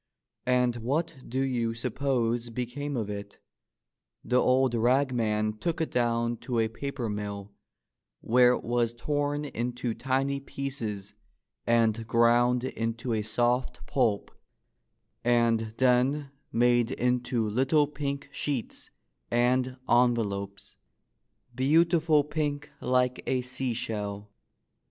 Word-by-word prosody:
And 125 -1 +2
what 145 +8 -1
do 130 +3 0
you 120 -4 -1
suppose 120 -1 -1
became 125 +4 -4
of 110 -3 -2
it? 100 -1 -7 0.9
The 125 0 +3
old 130 -1 +3
rag 125 +4 +2
man 110 -2 0
took 170 -1 -2
it 160 - -1
down 120 -1 +1
to 120 +1 -3
a 110 -1 +2
paper 125 +1 -4
mill, 105 -1 -5 0.7
where 125 +1 +5
it - - -3
was 120 -1 0
torn 145 +3 -1
into 120 -2 -3
tiny 135 +3 0
pieces 115 -8 -5 0.5
and 115 -1 +2
ground 120 +1 +3
into 115 -1 -2
a 110 - 0
soft 120 +4 0
pulp 110 -7 0 0.9
and 115 -2 +2
then 130 +3 +2 0.2
made 120 0 +3
into 125 -2 0
little 135 +7 +3
pink 140 -1 -4
sheets 140 -4 -3 0.4
and 125 +2 +1
envelopes 105 -5 0 0.4
— - - -50 0.3
beautiful 160 +3 +3
pink 145 -1 -3
like 125 0 +1
a 130 -1 +1
seashell! 110 -5 -4
125 Hz, 115 wpm, -28 LUFS, 115-135 Hz, 0.9 s, where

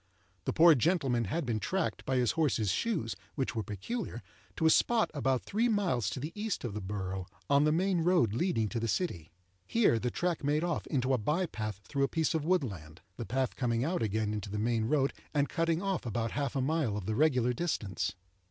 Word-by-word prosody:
The - - +1
poor 165 0 +8
gentleman 135 -5 +1
had 160 - -2
been 115 -3 -1
tracked, 190 - -2
by 130 - 0
his 125 -3 +3
horse's 125 - +1
shoes 165 - -1 0.2
(which 125 -4 -2
were 110 - 0
peculiar), 115 - -5 0.3
to 160 - -1
a 160 - +7
spot 235 +5 +3
about 135 -3 0
three 225 +4 +1
miles 175 - +1
to 95 - -4
the 150 +5 -4
east 210 0 -3
of 120 -5 -3
the 105 - -4
borough, 95 -1 -4 0.2
on 140 +1 +5
the 150 - +4
main 180 +2 +2
road 165 - +3
leading 120 - +1
to 120 - -2
the 115 - -1
city. 95 - -2 0.4
Here 220 - +3
the 125 - -1
track 175 +4 -1
made 150 +3 +1
off 170 -3 -2
into 130 -2 +1
a 130 - +2
by 155 - +1
path 110 - -5
through 140 - -3
a - - -1
piece 160 +1 0
of 160 -2 0
woodland—the 105 - -3
path 130 +4 -1
coming 120 -1 0
out 175 +3 -1
again 110 -1 0
into 105 -1 -4
the 105 - -3
main 115 +1 +1
road, 135 +2 +2 0.2
and 145 -1 +3
cutting 165 +1 0
off 195 -4 -1
about 115 0 -1
half 145 -1 -2
a 135 - +1
mile 135 -6 0
of 100 - -5
the 110 - -1
regular 125 -3 +3
distance. 110 - -2
130 Hz, 215 wpm, -31 LUFS, 110-165 Hz, 0.4 s, poor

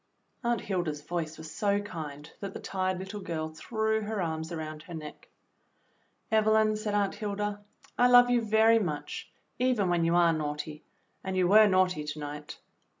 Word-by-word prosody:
Aunt 235 -2 +1
Hilda's 170 -7 -2
voice 160 -1 -3
was 160 0 -9
so 200 -1 +1
kind 155 -7 -7
that 195 -1 -6
the - - -4
tired 185 -1 -2
little 190 +3 -6
girl 160 -4 -3
threw 220 +7 -1
her 215 0 -3
arms 160 -1 -3
around 155 -2 -5
her 170 +2 -9
neck. 155 -1 -9 1.0
"Evelyn," 215 0 +4
said 215 -1 -2
Aunt 200 -1 +1
Hilda, 205 0 -3 0.4
"I 245 - +6
love 245 0 +7
you 245 -1 +3
very 220 +1 +4
much, 155 -8 -4 0.3
even 245 -7 +2
when 175 -1 +2
you 165 +1 +2
are 170 -1 +5
naughty, 150 0 -4 0.4
and 190 -1 -3
you 180 -1 +3
were 215 +3 +7
naughty 185 -5 +2
to 150 +1 -5
night. 150 0 -7
185 Hz, 170 wpm, -29 LUFS, 160-215 Hz, 1.0 s, love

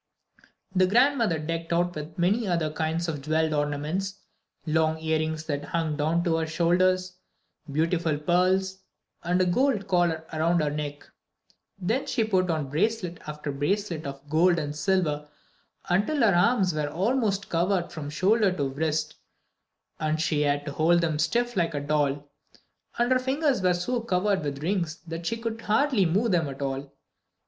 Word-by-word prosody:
The 185 0 +4
grandmother 235 - +3
decked 165 +2 -4
her 170 - +2
out 175 0 +1
with 155 0 -7
many 200 +6 +1
other 170 -4 0
kinds 160 +2 -2
of 150 -4 -3
jewelled 155 +2 +1
ornaments, 150 +7 -2 0.5
long 160 0 +1
earrings 160 0 -1
that 145 -2 -3
hung 165 -3 -2
down 160 +3 +1
to 165 -2 +1
her 160 -1 -1
shoulders, 185 +3 +1 0.5
beautiful 165 +1 +1
pearls, 185 +4 +1 0.4
and 175 +2 0
a 185 - +3
gold 210 +2 +1
collar 175 -4 +1
around 165 +2 +2
her 150 -2 0
neck. 145 -1 -5 0.7
Then 220 +8 -1
she 230 - +1
put 185 -4 +1
on 155 -5 -1
bracelet 180 +1 -1
after 150 -1 -4
bracelet 160 +2 -2
of 140 +1 -8
gold 170 +4 +3
and 150 -2 -3
silver 150 -3 0 0.6
until 205 +11 +1
her 220 -4 +5
arms 185 0 +3
were 150 -1 -1
almost 205 - 0
covered 175 +1 0
from 150 -3 -6
shoulder 195 +6 +2
to 140 -6 -1
wrist, 155 +2 -1 0.9
and 155 0 0
she 155 -2 +1
had 145 0 +1
to 145 - -4
hold 165 +4 +3
them 160 -3 0
stiff 240 +9 0
like 165 -3 0
a - - 0
doll. 145 -1 0 0.7
And 240 +1 +1
her 255 - +4
fingers 270 -1 0
were 180 -1 +3
so 235 +8 -1
covered 195 -2 +1
with 140 0 -4
rings 170 -3 -1
that 165 0 -5
she 230 - -1
could 225 -1 -4
hardly 220 -3 +2
move 205 +7 +1
them 165 -5 +1
at 135 +1 -6
all. 135 0 -4
170 Hz, 165 wpm, -26 LUFS, 155-190 Hz, 0.9 s, her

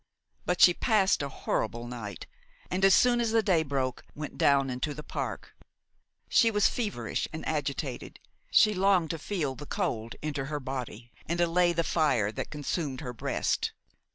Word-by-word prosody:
But 180 0 0
she 175 - +9
passed 200 -4 +2
a 140 - -3
horrible 120 -2 -2
night, 120 -4 -7 0.5
and, 185 +1 -1
as 195 -2 +7
soon 240 -1 +4
as 230 - +1
the 225 0 +3
day 180 -5 +3
broke, 135 -4 -2
went 150 -1 -6
down 135 -2 +3
into 135 +4 -3
the 150 - -7
park. - - -5 0.7
She 230 - +4
was 210 -2 +3
feverish 220 -5 -2
and - - -6
agitated; - - -3 0.3
she 215 -1 +5
longed 185 -4 +2
to 165 - -5
feel 150 -5 -2
the 145 +2 -10
cold 120 - -2
enter 145 -3 -2
her 150 +1 -3
body 125 -3 -6 0.2
and 170 +1 -1
allay 175 +1 +3
the 170 0 0
fire 145 -12 +1
that - - -5
consumed 150 -1 -3
her 125 -4 -5
breast. 115 - -1
155 Hz, 170 wpm, -29 LUFS, 130-185 Hz, 0.7 s, she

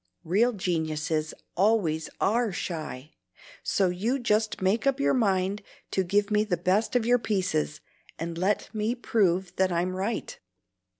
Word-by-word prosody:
Real 215 +9 +3
geniuses 160 -5 -1 0.2
always 180 -6 +2
ARE 230 +1 +2
shy; 155 -5 -5 0.5
so 190 -2 +1
you 210 +9 0
just 220 -3 +1
make 200 +7 +1
up 275 0 +2
your 280 - +3
mind 200 -4 +1 0.3
to 190 - +1
give 200 +3 +1
me 210 0 +3
the 195 -5 -1
best 190 +8 +1
of 240 -2 +3
your 245 +1 +4
pieces, 125 - -1 0.4
and 165 +1 -4
let 190 +7 0
me 215 +2 0
prove 190 -6 +1
that 190 -1 +2
I'm 175 +2 0
right." 200 +5 -3
190 Hz, 145 wpm, -27 LUFS, 175-220 Hz, 0.5 s, your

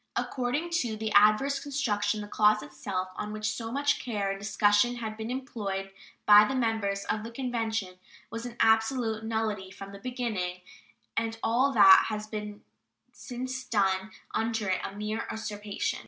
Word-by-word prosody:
According 265 +7 -2
to 225 -3 -3
the 220 0 -3
adverse 215 +7 +5
construction, 215 -8 -1
the 205 - -7
clause 215 0 +3
itself, 185 -2 -4
on 210 0 -4
which 215 0 -2
so 225 +2 -5
much 285 +2 +1
care 205 -5 -1
and 195 - -5
discussion 205 +3 +3
had 220 -2 -5
been 220 +1 -5
employed 210 -7 -4 0.3
by 210 0 +9
the 240 +5 -1
members 220 -5 0
of 215 - -2
the 230 - -6
Convention, 225 -6 -3 0.3
was 225 +1 -5
an 240 - -9
absolute 225 0 +2
nullity 220 -4 -2
from 195 +1 -10
the 200 - -10
beginning, 210 -7 -3 0.5
and 225 0 -1
all 255 +5 +3
that 195 -4 +8
has 215 -1 -4 0.9
since 255 +1 -5
been - - -26
done 195 -3 +1 0.2
under 225 -3 -1
it 185 - 0
a 195 - -5
mere 215 +2 -3
usurpation. 210 -2 -3
220 Hz, 160 wpm, -28 LUFS, 205-240 Hz, 0.9 s, by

